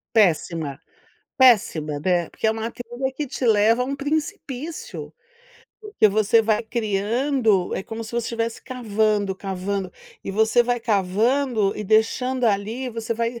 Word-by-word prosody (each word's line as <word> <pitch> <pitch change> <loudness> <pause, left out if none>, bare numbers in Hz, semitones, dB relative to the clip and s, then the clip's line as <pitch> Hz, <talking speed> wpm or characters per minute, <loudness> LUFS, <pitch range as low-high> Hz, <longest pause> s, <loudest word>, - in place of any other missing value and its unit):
Péssima, 165 -7 +1 0.6
péssima 205 - +4
né, 175 -2 +1
porque - - -5
é 220 - +4
uma 220 +1 -3
coisa 245 +3 -4
que 300 - -2
te 255 -1 -4
leva 225 +2 +4
a - - -3
um 275 +2 -3
precipício. 305 - -4 0.7
Porque 420 - +2
você 215 +2 +3
vai 215 -1 +2
criando, 220 -1 0
é - - -3
como 225 0 -6
se 225 - -8
você 235 -1 -2
estivesse 230 0 -3
cavando, 215 -5 0
cavando, 190 0 -4 0.3
e - - -3
você 220 +3 +3
vai 245 0 -1
cavando 220 +2 +1
e 210 - -4
deixando 245 +5 +1
ali 220 +4 0
E - - -4
você 230 0 -3
vai 235 +1 -2
225 Hz, 150 wpm, -23 LUFS, 200-245 Hz, 0.7 s, péssima